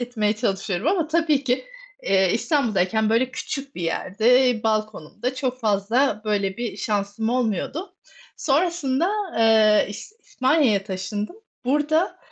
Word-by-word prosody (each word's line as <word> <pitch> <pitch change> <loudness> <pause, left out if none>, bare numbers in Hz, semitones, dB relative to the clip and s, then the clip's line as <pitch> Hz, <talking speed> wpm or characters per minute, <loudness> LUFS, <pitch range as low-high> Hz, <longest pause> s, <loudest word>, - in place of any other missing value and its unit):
etmeye 225 -4 0
çalışıyorum 195 0 -2
ama 340 -2 +2
tabii 315 -3 +1
ki, 255 - 0 0.4
eee, 190 - +2
İstanbul'dayken, 220 - +1
böyle, 245 +3 +2
küçük 275 +1 -6
bir 175 - -6
yerde, 225 +8 +2
balkonumda 215 - -2
çok 255 -1 -3
fazla, 215 +2 +1
böyle, 200 -3 -1
bir 235 -2 -4
şansım 205 +1 -2
olmuyordu. 250 - -2 0.4
Sonrasında, 320 +1 +1 0.3
eee, 220 -2 +5
İs 210 - -9
İspanya'ya 260 - +1
taşındım. 200 - -4 0.3
Burada 300 +6 +1
230 Hz, 115 wpm, -23 LUFS, 210-275 Hz, 0.4 s, eee